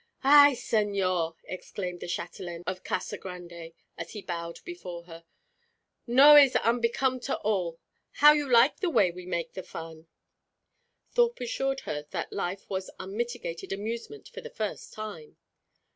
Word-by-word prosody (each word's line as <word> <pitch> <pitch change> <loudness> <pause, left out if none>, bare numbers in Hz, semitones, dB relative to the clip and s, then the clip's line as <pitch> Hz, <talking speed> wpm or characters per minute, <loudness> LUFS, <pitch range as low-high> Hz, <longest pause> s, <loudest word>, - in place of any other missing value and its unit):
"Ay, 285 0 +8
señor!" 190 -7 0
exclaimed 180 -1 -6
the - - -7
châtelaine 175 0 -5
of 185 0 -4
Casa 185 - -3
Grande, 175 -3 -9 0.3
as 165 0 -6
he 210 - -6
bowed 170 -1 -5
before 180 - -7
her. 165 -1 -12 0.8
"No 275 +5 +8
is 275 -3 +7
unbecome 240 +3 +1
at 255 - -8
all. 180 -6 -1 0.4
How 295 +1 +8
you 295 -3 -1
like 240 +4 +6
the 370 - 0
way 195 - +3
we 180 +1 -10
make 170 -2 -3
the 185 - -5
fun?" 165 -2 -10 1.0
Thorpe 480 -1 +2
assured 270 +3 -2
her 150 0 -5
that - - -4
life 185 +3 -4
was 190 -1 -4
unmitigated 215 -3 -5
amusement 230 - -5
for 485 -1 -9
the 475 - -8
first - - -5
time. 210 -8 -8
195 Hz, 145 wpm, -28 LUFS, 170-260 Hz, 1.0 s, Ay